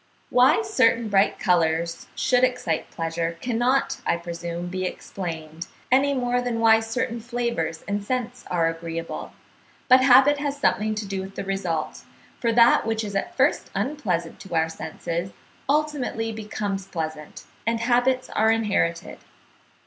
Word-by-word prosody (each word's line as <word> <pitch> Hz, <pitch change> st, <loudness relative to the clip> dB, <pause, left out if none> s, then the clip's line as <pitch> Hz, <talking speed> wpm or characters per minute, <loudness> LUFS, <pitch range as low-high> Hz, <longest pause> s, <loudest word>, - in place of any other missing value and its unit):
Why 255 Hz, -, +5 dB
certain 235 Hz, -, +2 dB
bright 200 Hz, 0 st, +3 dB
colours 170 Hz, -2 st, +1 dB
should 250 Hz, -1 st, +2 dB
excite 250 Hz, -11 st, 0 dB
pleasure 165 Hz, 0 st, -3 dB
cannot, 245 Hz, +4 st, 0 dB
I -, -, +1 dB
presume, 170 Hz, 0 st, -5 dB
be 185 Hz, +1 st, -4 dB
explained, 165 Hz, -3 st, -6 dB, 0.2 s
any 275 Hz, +2 st, +4 dB
more 245 Hz, -1 st, 0 dB
than 245 Hz, -2 st, -2 dB
why 225 Hz, -1 st, +6 dB
certain 225 Hz, +1 st, -2 dB
flavours 235 Hz, -9 st, -3 dB
and 200 Hz, 0 st, -2 dB
scents 250 Hz, +1 st, -3 dB
are 170 Hz, -2 st, +2 dB
agreeable; 165 Hz, 0 st, -5 dB, 0.6 s
but 255 Hz, 0 st, +7 dB
habit 270 Hz, +3 st, +6 dB
has 285 Hz, -1 st, -2 dB
something 215 Hz, -6 st, +1 dB
to 215 Hz, 0 st, -3 dB
do 195 Hz, -1 st, -3 dB
with 195 Hz, +1 st, -9 dB
the -, -, -4 dB
result, 185 Hz, -5 st, -3 dB, 0.4 s
for 235 Hz, -, +1 dB
that 235 Hz, +1 st, +5 dB
which 225 Hz, 0 st, 0 dB
is 200 Hz, -2 st, -5 dB
at 195 Hz, -, -3 dB
first 270 Hz, +2 st, +2 dB
unpleasant 195 Hz, -, -2 dB
to 185 Hz, -3 st, -7 dB
our 160 Hz, 0 st, +2 dB
senses, 170 Hz, +3 st, -5 dB, 0.4 s
ultimately 285 Hz, -6 st, 0 dB
becomes 205 Hz, -3 st, -4 dB
pleasant, 155 Hz, -4 st, -6 dB, 0.2 s
and 230 Hz, 0 st, +1 dB
habits 250 Hz, +2 st, +2 dB
are 220 Hz, +1 st, +2 dB
inherited. 210 Hz, -7 st, 0 dB
215 Hz, 145 wpm, -24 LUFS, 170-245 Hz, 0.6 s, but